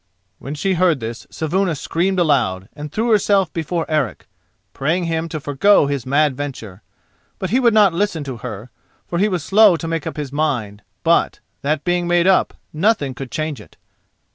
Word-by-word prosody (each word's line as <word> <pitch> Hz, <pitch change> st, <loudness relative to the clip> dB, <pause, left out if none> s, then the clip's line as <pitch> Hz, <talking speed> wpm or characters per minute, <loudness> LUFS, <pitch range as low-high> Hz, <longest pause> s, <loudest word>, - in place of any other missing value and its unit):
When 140 Hz, +2 st, -6 dB
she 190 Hz, +6 st, 0 dB
heard 175 Hz, -4 st, +2 dB
this 115 Hz, 0 st, -7 dB
Saevuna 175 Hz, +2 st, -1 dB
screamed 180 Hz, +6 st, -1 dB
aloud, 125 Hz, -, +1 dB
and 150 Hz, 0 st, -7 dB
threw 225 Hz, +5 st, 0 dB
herself 200 Hz, -3 st, +2 dB
before 165 Hz, +1 st, -2 dB
Eric, 150 Hz, -7 st, -2 dB, 0.5 s
praying 165 Hz, +6 st, 0 dB
him 165 Hz, 0 st, -2 dB
to 155 Hz, -, -4 dB
forgo 145 Hz, +6 st, +3 dB
his 140 Hz, -3 st, -3 dB
mad 145 Hz, 0 st, +2 dB
venture. 125 Hz, -9 st, -7 dB, 0.6 s
But 190 Hz, -, -4 dB
he 250 Hz, -, +3 dB
would 240 Hz, -3 st, +4 dB
not 205 Hz, -5 st, +5 dB
listen 175 Hz, -4 st, -1 dB
to 135 Hz, -3 st, -6 dB
her, 115 Hz, 0 st, -8 dB, 0.3 s
for 170 Hz, -, -3 dB
he 210 Hz, +2 st, +3 dB
was 180 Hz, -6 st, -2 dB
slow 205 Hz, 0 st, +5 dB
to 165 Hz, -, -6 dB
make 165 Hz, -2 st, -3 dB
up -, -, -6 dB
his 145 Hz, -3 st, -4 dB
mind, 125 Hz, -9 st, -2 dB, 0.2 s
but, -, -, +2 dB, 0.2 s
that 150 Hz, +1 st, -1 dB
being 175 Hz, -1 st, 0 dB
made 175 Hz, 0 st, +3 dB
up, 190 Hz, 0 st, +3 dB, 0.2 s
nothing 160 Hz, -5 st, +1 dB
could 130 Hz, +1 st, -7 dB
change 155 Hz, -5 st, -4 dB
it. 90 Hz, -, -18 dB
155 Hz, 185 wpm, -19 LUFS, 135-185 Hz, 0.6 s, not